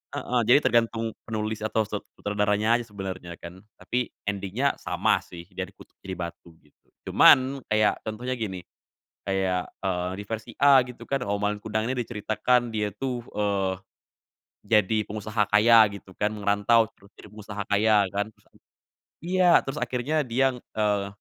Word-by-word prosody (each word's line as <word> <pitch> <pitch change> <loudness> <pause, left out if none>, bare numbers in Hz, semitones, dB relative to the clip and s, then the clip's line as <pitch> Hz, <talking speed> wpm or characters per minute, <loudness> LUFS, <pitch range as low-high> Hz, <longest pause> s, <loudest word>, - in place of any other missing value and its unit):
heeh, 125 -1 0
jadi 125 - +7
tergantung 115 -1 +1 0.2
penulis 110 -1 -3
atau 110 0 +1
set 105 -1 -4 0.2
sutradaranya 105 +2 +1
aja 120 - -7
sebenernya 95 -4 -7
kan. 85 +2 -11 0.2
Tapi 125 +6 -2 0.2
ending-nya 100 +7 -1
sama - - +1
sih, 85 -1 -11
dia 95 -1 -4
dikutuk 100 - -17
jadi 95 -1 -4
batu, 85 -1 -8
gitu. 75 - -31 0.2
Cuman, 130 +2 +6
kayak, 110 -1 +2
contohnya 115 +4 -4
gini, 95 -5 -4 0.6
kayak, 95 -2 -1
eee, 90 -2 -1
di - - -7
versi 110 +1 -5
A 140 -2 +7
gitu 125 -1 -11
kan, 135 -2 -1
oh, 100 -1 -2
Malin 105 0 0
Kundang 110 +2 -2
nih 130 - -2
diceritakan 115 +2 0
dia 105 -3 -2
tuh, 125 +1 -4
eee, 100 -2 0 0.9
jadi 110 -1 +2
pengusaha 105 0 -1
kaya 110 +1 +6
gitu 100 -1 -11
kan, 105 +1 0
ngerantau 105 +2 +2
terus 100 - -21
jadi - - -14
pengusaha 105 -1 -6
kaya 105 +1 +3 0.2
kan 100 +1 0 1.0
iya, 180 0 +4
terus 135 +2 -5
akhirnya 125 +6 0
dia, 130 +3 +2
eee, 105 -4 -1
110 Hz, 155 wpm, -26 LUFS, 100-120 Hz, 1.0 s, jadi